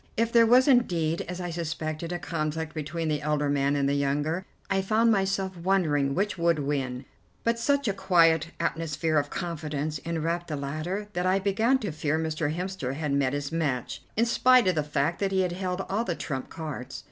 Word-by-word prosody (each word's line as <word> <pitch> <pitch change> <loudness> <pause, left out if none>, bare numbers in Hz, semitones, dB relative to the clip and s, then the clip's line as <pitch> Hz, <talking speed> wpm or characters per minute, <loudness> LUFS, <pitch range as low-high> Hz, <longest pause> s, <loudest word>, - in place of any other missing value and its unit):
If 230 +1 +1
there 230 -1 +6
was 250 +3 +6
indeed, 175 - +2
as 180 0 -5
I 175 -1 -4
suspected, 160 0 -4
a 175 - -1
conflict 160 0 -3
between 160 +2 -3
the 150 -1 0
elder 150 -1 0
man 140 0 +1
and 140 -1 +1
the 140 - +1
younger, 145 +5 0 0.2
I 195 0 +1
found 220 +4 +3
myself 195 -2 0
wondering 165 -6 +1
which 200 -1 -1
would 170 -1 +3
win, 135 -3 -2 0.4
but 230 0 +1
such 280 +2 +1
a 200 - +1
quiet 165 -4 +4
atmosphere 165 -1 0
of 145 - -3
confidence 155 -3 -3
enwrapped 170 +1 -2
the 155 - -3
latter 155 +9 -3
that 180 0 0
I 185 +1 +3
began 220 +6 +2
to 205 -6 -2
fear 155 0 -1
Mr. 160 -1 -1
Hemster 175 -6 -3
had 150 -1 -2
met 140 -1 +1
his 145 0 -3
match, 145 -7 -2 0.2
in 230 - +4
spite 250 0 +5
of 185 - +4
the 155 - +1
fact 150 +2 -1
that 195 -1 0
he 190 -1 +2
held 180 +1 -2
all 210 +4 0
the 175 -7 -2
trump 130 -5 -4
cards. 135 -5 -6
165 Hz, 195 wpm, -27 LUFS, 150-190 Hz, 0.4 s, there